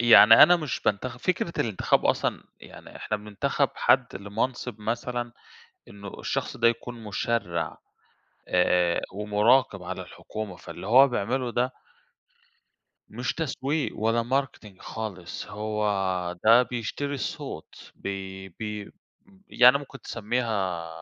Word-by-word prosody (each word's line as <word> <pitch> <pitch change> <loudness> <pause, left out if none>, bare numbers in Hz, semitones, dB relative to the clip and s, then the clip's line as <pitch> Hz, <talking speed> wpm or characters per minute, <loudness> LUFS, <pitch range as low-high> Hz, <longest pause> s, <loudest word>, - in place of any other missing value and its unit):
يعني 115 -2 +9
أنا 175 - +8
مش 150 -6 -4
بانتخب. 125 +5 -1
فكرة 170 -2 -1
الانتخاب 110 -5 +1
أصلًا - - 0 0.2
يعني - - -13
إحنا 105 - -3
بننتخب 105 +7 -1
حد 125 -2 +2
لمَنصِب 110 +3 -3
مثلًا 120 +2 -3 0.6
إنه 100 -1 -10
الشخص - - -3
ده 115 - +4
يكون 120 0 -4
مُشرّع، 100 -4 -2 0.7
آآ 90 -1 +2
ومُراقِب 105 +1 +2
على 90 +1 -5
الحكومة. 105 -4 -7
فاللي 95 - -9
هو 130 +5 +7
بيعمله 125 +1 -1
ده 125 +2 0 1.4
مش 120 +3 -3
تسويق، 150 -1 -2
ولا 115 +2 +1
marketing 120 -6 -3
خالص. 95 -6 -6
هو 105 +1 -3 0.6
ده 115 +3 +7
بيشتري 125 +4 -4
الصوت، 135 - -7
بي 95 -1 -6
بي 105 +2 -7 0.6
يعني 125 +2 +6
ممكن 140 -2 -11
تسمّيها 105 -8 -2
115 Hz, 115 wpm, -26 LUFS, 100-125 Hz, 1.4 s, يعني